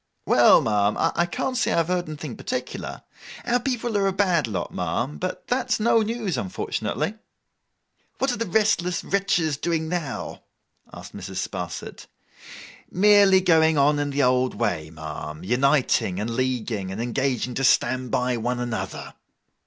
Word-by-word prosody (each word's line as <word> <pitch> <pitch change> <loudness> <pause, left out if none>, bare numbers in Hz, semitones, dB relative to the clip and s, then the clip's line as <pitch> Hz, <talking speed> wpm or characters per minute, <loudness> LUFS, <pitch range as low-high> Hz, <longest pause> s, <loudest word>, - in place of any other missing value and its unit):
'Well, - - +6
ma'am, 105 -1 +1
I 170 +1 +1
can't 255 +8 -3
say 245 - +1
that - - +1
I - - 0
have 165 -1 +2
heard 180 -2 0
anything 150 -4 -6
particular. 255 0 -5 0.4
Our 245 0 +2
people 240 -3 -2
are 195 - +2
a - - +2
bad 180 - +1
lot, 95 -6 -4
ma'am; 95 - -2
but 185 0 -4
that 250 +2 0
is - - 0
no 230 +1 +3
news, 220 -4 -2
unfortunately.' 195 - -3 1.0
'What 265 0 +1
are - - -1
the 230 0 -2
restless 180 -3 +1
wretches 180 -7 0
doing 160 0 -1
now?' 165 -7 -4 0.5
asked - - -11
Mrs. - - -4
Sparsit. - - -7 0.8
'Merely 200 -1 +5
going 160 -3 +4
on 145 +1 +3
in 145 0 -1
the 140 0 0
old 125 0 +2
way, 90 -10 -1
ma'am. 75 -1 -7
Uniting, 125 -4 +2
and 110 +3 -2
leaguing, 115 -6 -2
and 95 - -6
engaging 125 0 -1
to 135 - -2
stand 130 0 +2
by 125 0 0
one 120 +2 -2
another. 110 -6 -4
145 Hz, 160 wpm, -24 LUFS, 120-190 Hz, 1.0 s, Well